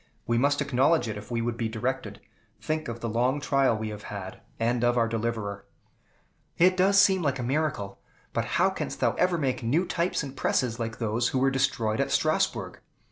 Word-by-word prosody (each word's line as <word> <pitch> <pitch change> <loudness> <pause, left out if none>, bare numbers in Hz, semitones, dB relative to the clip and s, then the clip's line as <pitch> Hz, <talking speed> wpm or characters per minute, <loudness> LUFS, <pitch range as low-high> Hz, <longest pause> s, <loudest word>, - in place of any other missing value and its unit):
We 115 0 +1
must 145 +2 +2
acknowledge 140 +2 +2
it 110 - -3
if 105 0 -9
we 115 -1 -1
would 120 0 -2
be 115 -1 -1
directed. 110 -2 -3 0.4
Think 155 +8 -2
of 115 0 -6
the 115 - -2
long 125 +5 +1
trial 135 -5 +2
we 110 0 -4
have 105 -1 -7
had, 95 -2 -7 0.2
and 120 +1 +1
of 120 0 +3
our 115 -1 +3
deliverer." 110 -3 -3 0.9
"It 185 +2 +5
does 195 +2 +4
seem 190 -2 +5
like 140 -4 0
a 125 - -4
miracle. 125 -7 -2 0.3
But - - 0
how - - +4
canst - - -5
thou - - +2
ever 180 -1 +2
make 135 -5 -1
new 145 +10 +1
types 170 -1 -1
and 135 -1 -7
presses 125 -3 0
like 115 -1 -3
those 115 +1 0
which 130 - 0
were 135 +1 +3
destroyed 115 -4 0
at - - +1
Strasbourg?" - - 0
120 Hz, 200 wpm, -27 LUFS, 115-140 Hz, 0.9 s, It